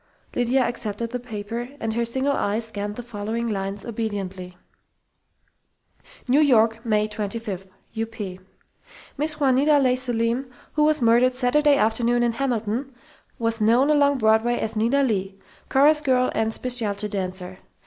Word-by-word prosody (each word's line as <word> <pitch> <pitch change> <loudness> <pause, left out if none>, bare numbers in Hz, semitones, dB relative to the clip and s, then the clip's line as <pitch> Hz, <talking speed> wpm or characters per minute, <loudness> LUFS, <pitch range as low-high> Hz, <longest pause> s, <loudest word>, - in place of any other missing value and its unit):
Lydia 245 +2 +2
accepted 230 -1 -3
the 250 - -3
paper 230 +1 -6
and 225 -1 -2
her 235 +1 0
single 265 +4 0
eye 205 -2 0
scanned 210 -2 -5
the 245 - -7
following 230 0 -4
lines 195 -1 -4
obediently: 195 -6 -5 1.7
New 260 +4 +4
York, 230 -6 +3
May 215 -2 +1
25 210 -2 -5 0.4
(UP) 225 - -1 1.1
Mrs. 305 +1 0
Juanita 280 +2 +4
Leigh 255 -3 +3
Selim, 245 0 +1 0.2
who 300 - +2
was 305 -3 +2
murdered 240 +2 +4
Saturday 285 +3 +3
afternoon 235 +1 +1
in 240 - +2
Hamilton,, 235 +1 -2 0.5
was 230 -2 -1
known 240 +7 +4
along 285 -1 +3
Broadway 220 +1 +3
as 220 - -3
Nita 235 +6 +2
Leigh, 195 -6 -1 0.3
chorus 295 +3 +5
girl 255 -3 +2
and 220 0 0
specialty 220 -4 -1
dancer. 185 -2 -5
230 Hz, 140 wpm, -23 LUFS, 215-255 Hz, 1.7 s, chorus